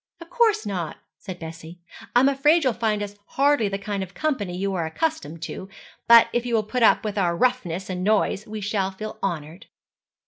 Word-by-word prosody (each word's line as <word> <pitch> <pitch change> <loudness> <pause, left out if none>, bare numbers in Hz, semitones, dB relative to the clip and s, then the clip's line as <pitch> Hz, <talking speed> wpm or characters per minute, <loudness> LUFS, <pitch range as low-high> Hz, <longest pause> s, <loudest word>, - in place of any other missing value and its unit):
'Of 335 0 -13
course 455 -3 +2
not,' 180 -6 -4 0.2
said 185 -3 -7
Bessie. 165 +1 -9 0.4
'I'm 250 +2 +6
afraid 295 +4 +3
you'll 255 -3 +2
find 215 -2 -1
us 205 0 -7 0.2
hardly 280 -5 +3
the 195 - -2
kind 200 0 -4
of 190 0 -7
company 220 -13 -2
you 195 +1 -1
are 170 -3 -1
accustomed 165 - -3
to; 190 +3 -6 0.4
but 230 -1 +8
if 240 - +1
you 240 -1 -1
will 220 - +2
put 245 +4 -3
up 225 - +5
with 210 -1 -2
our 170 -3 +1
roughness 195 -8 0
and 180 -1 -4
noise 210 0 +1
we 215 0 -6
shall 200 -1 -1
feel 215 +3 -8
honoured.' 165 -2 -4
205 Hz, 200 wpm, -24 LUFS, 185-245 Hz, 0.4 s, but